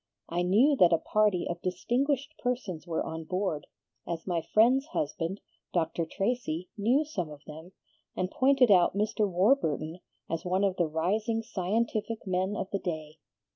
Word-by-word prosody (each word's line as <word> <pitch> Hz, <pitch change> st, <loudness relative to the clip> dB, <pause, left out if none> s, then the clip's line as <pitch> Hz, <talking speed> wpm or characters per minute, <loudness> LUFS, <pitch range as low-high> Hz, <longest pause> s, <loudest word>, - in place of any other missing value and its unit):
I 175 Hz, +1 st, 0 dB
knew 220 Hz, +12 st, +4 dB
that 180 Hz, -6 st, +6 dB
a 165 Hz, -, +5 dB
party 205 Hz, +1 st, +1 dB
of 170 Hz, 0 st, -4 dB
distinguished 265 Hz, -, -1 dB
persons 210 Hz, -10 st, -3 dB
were 165 Hz, -2 st, -1 dB
on 160 Hz, 0 st, -5 dB
board, 180 Hz, -4 st, -2 dB, 0.4 s
as 165 Hz, -1 st, -4 dB
my 175 Hz, -3 st, 0 dB
friend's 240 Hz, -, +3 dB
husband, 170 Hz, -, -3 dB, 0.3 s
Dr. 165 Hz, -1 st, 0 dB
Tracy, 195 Hz, -4 st, -2 dB
knew 245 Hz, +9 st, +2 dB
some 185 Hz, -, -4 dB
of 150 Hz, 0 st, -11 dB
them, 160 Hz, +4 st, -11 dB, 0.4 s
and 185 Hz, +1 st, -2 dB
pointed 260 Hz, -3 st, +4 dB
out 185 Hz, 0 st, +5 dB
Mr. 210 Hz, 0 st, +1 dB
Warburton 175 Hz, -, +1 dB, 0.3 s
as 165 Hz, 0 st, -3 dB
one 185 Hz, +2 st, 0 dB
of 195 Hz, -2 st, +1 dB
the 175 Hz, -, +2 dB
rising 210 Hz, +8 st, 0 dB
scientific 220 Hz, +2 st, -2 dB
men 185 Hz, +2 st, 0 dB
of 190 Hz, -, -4 dB
the 200 Hz, -, -1 dB
day. 155 Hz, -4 st, -5 dB
185 Hz, 160 wpm, -29 LUFS, 165-225 Hz, 0.4 s, that